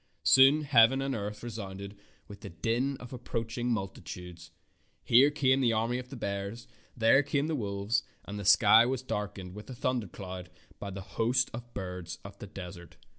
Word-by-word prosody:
Soon 135 +3 +7
heaven 135 -2 +5
and 135 0 -1
earth 105 -1 -5
resounded 100 -3 -7 0.3
with 100 -1 -11
the - - -7
din 115 +11 -1
of 125 +1 -10
approaching 120 0 -3
multitudes. 90 -5 -6 0.5
Here 130 +5 +6
came 135 -3 +2
the 120 -3 +3
army 115 +3 0
of 125 0 -9
bears, 100 +3 -4 0.3
there 115 +4 +5
came 145 0 0
the 160 - -2
wolves, 100 -3 -1 0.2
and 105 0 -6
the - - -5
sky 110 +3 +7
was 130 +1 -1
darkened 105 -5 -4
as - - -13
with 105 - -10
a 130 - -7
thundercloud 95 -7 -4 0.3
by 100 - -5
the 95 0 -6
host 120 +5 0
of 120 +1 -8
birds 90 -2 -5
of 100 0 -9
the 105 - -8
desert. 90 -2 -10
110 Hz, 175 wpm, -30 LUFS, 100-125 Hz, 0.5 s, Soon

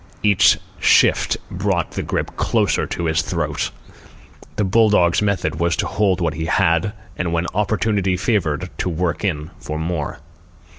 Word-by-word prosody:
Each 105 -2 +5 0.2
shift - - +4
brought 95 -2 -1
the - - -3
grip - - -3
closer - - +1
to 85 - -3
his 80 +1 +2
throat. - - -2 0.9
The 105 - 0
bull 110 +3 +4
dog's 85 -3 +3
method 90 -6 -1
was 85 0 +1
to - - -1
hold 100 -3 +1
what 85 -3 0
he 80 +1 -4
had, 85 +3 +2 0.2
and 90 -2 -2
when 85 +1 0
opportunity 100 -2 0
favoured 90 -4 -1
to - - 0
work 85 +1 -2
in 80 -4 -2
for 75 - -5
more. 80 -3 -3
90 Hz, 155 wpm, -20 LUFS, 80-100 Hz, 0.9 s, Each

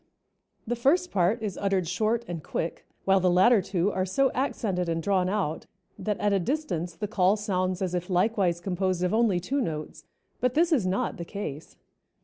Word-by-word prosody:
The 240 - -1
first 320 +10 +2
part 195 +4 +1
is 205 -3 -3
uttered 195 -3 +1
short 220 +6 0
and 170 -2 -5
quick, 165 - -4 0.2
while 195 0 +4
the 185 0 +3
latter 190 +5 +5
two 190 +1 0
are 185 - -1
so 255 +9 +2
accented 200 -9 -1
and 165 0 0
drawn 185 -1 +2
out, 190 -6 -2 0.3
that 210 -2 -1
at 205 -1 +2
a 195 - +3
distance 180 - -2
the 210 +5 -3
call 195 -1 +3
sounds 185 -2 -1
as 180 -1 -2
if 180 +1 -3
likewise 185 -2 +2
composed 185 0 -1
of 180 - +1
only 220 -5 +3
two 270 +11 -1
notes, 155 -8 -5 0.3
but 250 0 0
this 335 +2 +3
is 240 - +2
not 185 +2 -1
the 170 - -5
case. 165 -6 -7
190 Hz, 190 wpm, -27 LUFS, 180-220 Hz, 0.3 s, latter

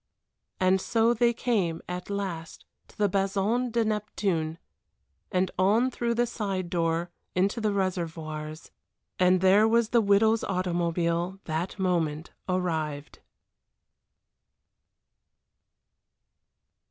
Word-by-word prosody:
And 185 0 +3
so 230 +2 +2
they 240 0 +3
came 205 -9 0
at 180 +1 -5
last 190 -5 -5 0.2
to - - -21
the 210 - +3
Bason 200 +5 0
de 230 0 +1
Neptune, 195 -7 -1 0.7
and 185 -1 +1
on 220 +7 +3
through 235 -1 -1
the 240 +1 +2
side 195 -6 -3
door 170 0 0 0.2
into 195 +5 +1
the 215 - +1
Réservoirs 160 -5 -3 0.5
and 180 0 +4
there 195 +3 +5
was 230 0 +3
the 235 - +4
widow's 220 +2 +3
automobile 175 -1 -1
that 160 +5 -3
moment 170 -4 -1 0.2
arrived. 160 -5 -2
185 Hz, 105 wpm, -27 LUFS, 170-215 Hz, 0.7 s, there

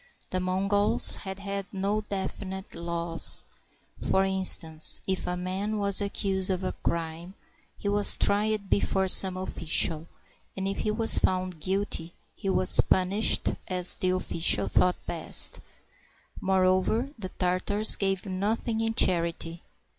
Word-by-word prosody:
The 185 - -2
Mongols 195 +3 +3
had 190 -1 -8
had 200 -1 -6
no 200 +2 -3
definite 190 -1 -7
laws. 170 0 0 0.5
For 190 - 0
in 190 0 -3
stance, 160 -3 +6
if 190 -1 -3
a 180 0 -4
man 190 +4 -5
was 200 -1 +4
accused 195 -1 -3
of 185 0 -3
crime, 170 +2 -5 0.4
he - - -7
was 205 0 0
tried 210 0 0
before 190 -1 -1
some 185 0 +7
oflficial, 165 -3 -1 0.5
and 190 0 -4
if 195 - -5
he - - -3
was 225 +1 +2
found 185 -2 -2
guilty, 185 -1 -4 0.2
he 195 - -6
was 185 -1 +4
punished 190 +4 +1 0.2
as 180 -1 +3
the 185 - -2
oflficial 165 - 0
thought 180 0 +1
best. - - -1 0.8
Moreover, 190 +7 0
the 190 -3 -6
Tartars 185 +4 +1
gave 195 -1 -3
nothing 215 +4 -3
in 225 0 -3
charity. 170 -2 0
190 Hz, 130 wpm, -25 LUFS, 180-200 Hz, 0.8 s, some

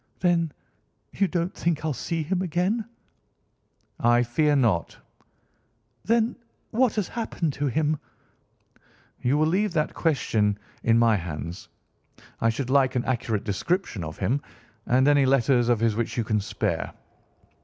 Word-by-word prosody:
"Then 170 -3 +2 0.6
you 195 - +1
don't 175 0 -1
think 160 -2 -1
I'll 155 - 0
see 165 +4 -3
him 180 +4 -1
again?" 190 +6 0 1.1
"I 120 +1 +4
fear 145 +5 +2
not." 115 -11 +1 1.1
"Then 230 +1 +2 0.4
what 240 0 +2
has 210 -4 0
happened 180 -9 -2
to 145 +1 -1
him?" 150 +3 0 1.2
"You 130 +4 +2
will 155 - +3
leave 190 +4 +1
that 155 -3 0
question 110 -10 +1 0.2
in 115 0 +3
my 115 -1 +4
hands. 85 0 -6 0.7
I 115 - +3
should 125 +3 -2
like 135 -1 +3
an 125 - 0
accurate 115 -4 -1
description 110 - -1
of 80 0 -7
him 125 +9 0 0.5
and 130 +3 +4
any 145 -2 +5
letters 130 -2 +3
of 120 -3 +3
his 115 -2 +2
which 115 +2 -2
you 120 - +1
can 105 0 0
spare." - - -2
140 Hz, 145 wpm, -25 LUFS, 115-170 Hz, 1.2 s, any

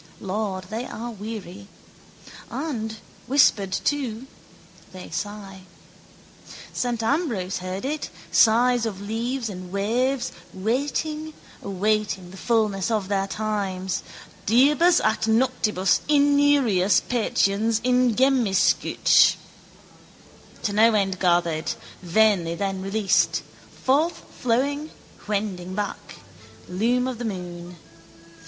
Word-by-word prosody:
Lord, 195 -1 -3
they 230 +3 -3
are 235 +2 -6
weary; 205 -3 -8 0.8
and, 230 -7 -4 0.3
whispered 235 -8 +3
to, 255 0 -2 0.7
they 185 -1 -10
sigh. 200 -2 -6 1.1
Saint 240 -2 -2
Ambrose 225 - -1
heard 185 +4 -5
it, 300 +2 -3 0.2
sigh 240 +3 +5
of 215 -4 -3
leaves 230 +4 -3
and 185 -3 -8
waves, 240 +6 0 0.2
waiting, 290 +9 -2 0.3
awaiting 200 -2 -1
the 190 - -11
fullness 215 -3 0
of 210 -4 -1
their 195 -1 0
times, 195 -3 -2 0.5
diebus 295 - +5
ac 220 0 +1
noctibus 220 -5 +2
iniurias 285 -10 +4
patiens 220 -2 +1
ingemiscit. 250 -3 +3 1.3
To 205 - -1
no 220 +2 +5
end 195 -2 0
gathered; 170 -3 +1 0.3
vainly 180 -2 +2
then 195 +1 -3
released, 195 +1 +1 0.4
forthflowing, 285 -1 0 0.4
wending 195 -3 -3
back: 205 -1 -5 0.5
loom 235 +7 +1
of 255 -3 -5
the 240 - -4
moon. 175 -3 -6
215 Hz, 95 wpm, -24 LUFS, 195-250 Hz, 1.3 s, sigh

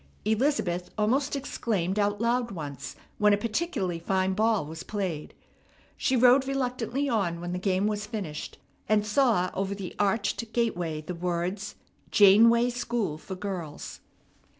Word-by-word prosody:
Elizabeth 215 -7 0
almost 265 +7 +1
exclaimed 210 -8 -1
out 205 0 +1
loud 235 +1 +1
once 145 - -6 0.2
when 210 0 +5
a - - +4
particularly 205 - -2
fine 190 +2 0
ball 215 -3 +2
was 160 +2 -7
played. 180 -6 -4 0.6
She 265 - +1
rode 255 +2 +5
reluctantly 260 0 -1
on 195 -9 0
when 175 +1 -5
the 180 - -2
game 190 +1 +1
was 210 0 -1
finished, 190 -9 -5 0.3
and 210 -1 +3
saw 215 -5 +2
over 195 +1 -2
the 195 -3 -6
arched 205 +2 0
gateway 175 -10 -1
the 170 +4 -6
words, 180 +4 -3 0.3
"Janeway 230 +4 +6
School 235 -9 -2
for 190 - -7
Girls." 185 -6 -6
205 Hz, 140 wpm, -27 LUFS, 180-235 Hz, 0.6 s, Janeway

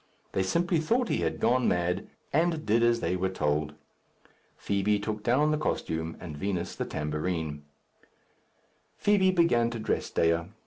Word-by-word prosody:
They 95 - 0
simply 170 - +1
thought 235 +10 +1
he - - +1
had - - -1
gone 125 +2 +2
mad, 90 +2 0 0.3
and 160 +1 +1
did 115 +2 +3
as 120 0 +3
they 90 - 0
were 95 +1 0
told. 75 -4 -1 0.8
Fibi 100 +1 +1
took 105 +1 -3
down 140 +7 +2
the 155 - 0
costume, 80 - -2
and 80 -4 -7
Vinos 90 +2 -3
the - - -3
tambourine. 75 0 -3 1.3
Fibi 200 -2 +3
began 165 -11 +3
to 120 - -5
dress 110 - -2
Dea. 85 0 +1
105 Hz, 150 wpm, -28 LUFS, -, 1.3 s, did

